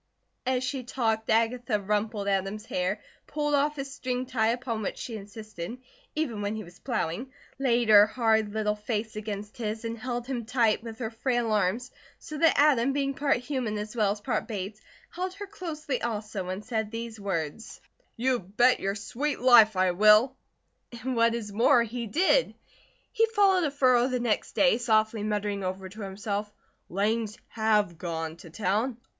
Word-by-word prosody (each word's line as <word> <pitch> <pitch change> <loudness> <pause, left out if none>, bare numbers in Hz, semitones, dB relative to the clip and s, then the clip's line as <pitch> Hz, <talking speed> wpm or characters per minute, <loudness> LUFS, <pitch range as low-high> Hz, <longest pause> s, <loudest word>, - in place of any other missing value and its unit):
'" - - -50
As 250 - -2
she 255 0 -3
talked 225 -3 -1
Agatha 230 0 +2
rumpled 210 +1 -1
Adam's 195 +2 -1
hair, 185 +2 -2 0.2
pulled 295 0 -1
off 290 +1 +2
his 275 -1 -5
string 255 -2 -3
tie, 235 -4 +1
upon 235 -1 -1
which 205 - -3
she 235 - -6
insisted, 215 0 -7 0.4
even 260 -9 -2
when 205 +1 -2
he 215 - -5
was 175 -1 -15
plowing; 235 0 -3 0.3
laid 240 -4 +2
her 210 0 +9
hard 220 -2 +1
little 210 0 0
face 215 +1 -3
against 210 -1 -6
his, 220 0 -3
and 230 0 -3
held 245 0 -3
him 250 -2 -3
tight 230 -2 +2
with 225 -1 -8
her 230 -3 -4
frail 240 -1 0
arms, 210 +4 0 0.3
so 310 - -9
that 325 0 +4
Adam 275 -3 +4
being 275 -1 0
part 280 -1 +1
human 250 -4 -3
as 210 +2 -5
well 210 -4 +2
as 205 - -4
part 205 - -2
Bates, 205 0 -5 0.3
held 370 +1 -4
her 405 +1 -6
closely 320 -9 -4
also 210 -4 -3
and 190 +3 -5
said 220 -2 -2
these 230 0 -6
words: 190 0 -4 0.4
"You 250 +1 +1
bet 225 +7 +3
your 195 +1 -1
sweet 265 +8 -3
life 235 -4 +7
I 185 0 +3
will!" 215 +7 +5 0.6
And 245 +2 -4
what 230 0 +3
is 210 -3 -5
more 235 +3 +5
he 235 +1 -4
did. 375 - +2 0.6
He 455 -2 +3
followed 395 -5 +3
a - - +1
furrow 255 -3 +3
the 255 -1 -1
next 235 -3 -1
day, 265 -4 +4
softly 220 -2 +2
muttering 205 -1 -2
over 190 +1 -4
to 210 +3 -10
himself: 205 +1 -3 0.4
"Langs 215 +3 0
have 210 -6 +1
gone 165 -2 -4
to 170 - -12
town. 215 +7 -1
225 Hz, 175 wpm, -28 LUFS, 210-250 Hz, 0.6 s, her